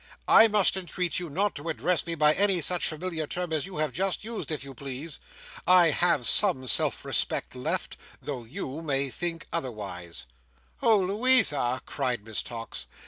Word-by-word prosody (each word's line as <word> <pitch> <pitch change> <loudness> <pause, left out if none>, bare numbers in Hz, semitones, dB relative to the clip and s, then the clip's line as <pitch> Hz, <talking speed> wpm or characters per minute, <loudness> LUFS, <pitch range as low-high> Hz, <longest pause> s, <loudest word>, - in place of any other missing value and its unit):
I 225 - +7
must 210 -3 +3
entreat 180 -2 -2
you 175 -2 -6
not 195 +7 -1
to 155 +3 -6
address 175 +2 0
me 170 - -2
by 150 -1 +4
any 195 +1 +1
such 175 +3 +1
familiar 160 -1 -4
term 175 0 -4
as 155 +2 -1
you 190 - -9
have 155 -2 0
just 190 +6 -2
used, 225 -2 -6
if 155 -3 -2
you 140 -1 -9
please. 140 +4 -6 0.5
I 180 -3 +6
have 170 -5 +1
some 175 - +5
self - - +3
respect - - 0
left, 65 - -3 0.2
though 135 -5 -6
you 130 +5 -6
may 140 -3 -1
think 170 +1 -4
otherwise." 100 - -5 0.6
"Oh, 220 -2 +4
Louisa!" 195 - +3
cried 125 -7 -3
Miss 110 -2 -2
Tox. 115 - -7
160 Hz, 170 wpm, -27 LUFS, 135-180 Hz, 0.6 s, I